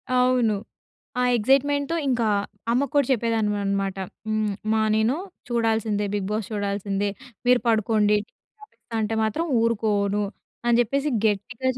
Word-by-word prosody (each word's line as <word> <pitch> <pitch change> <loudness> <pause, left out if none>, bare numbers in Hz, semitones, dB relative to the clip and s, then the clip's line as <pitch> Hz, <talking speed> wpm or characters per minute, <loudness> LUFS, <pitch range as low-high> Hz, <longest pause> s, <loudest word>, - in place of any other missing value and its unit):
అవును. 250 -4 +3 0.7
ఆ - - +3
ఎక్సైట్‌మెంట్‌తో 285 +6 +2
ఇంకా 240 -3 +1 0.5
అమ్మకు 270 +2 +1
కూడా 285 - +4
చెప్పేదాన్ని 225 -3 0
అన్నమాట. 195 -1 -1 0.3
హ్మ్. 215 -1 0
అమ్మా 220 0 +1 0.2
నేను 220 +5 +2 0.3
చూడాల్సిందే 220 -3 0
'బిగ్ 195 -2 -1
బాస్' 215 -2 -2
చూడాల్సిందే. 200 0 -1 0.4
మీరు 250 -1 +5
పడుకోండి 215 -1 +3
టీవి 430 - -42
ఆపిస్తా 240 - -15
అంటే 220 +1 -1
మాత్రం 300 +11 0 0.2
ఊరుకోను. 210 -3 +1 0.4
అని 235 -1 +4
చెప్పేసి 275 +5 0 0.2
గట్టిగా 225 +5 0
220 Hz, 125 wpm, -24 LUFS, 205-250 Hz, 0.7 s, మీరు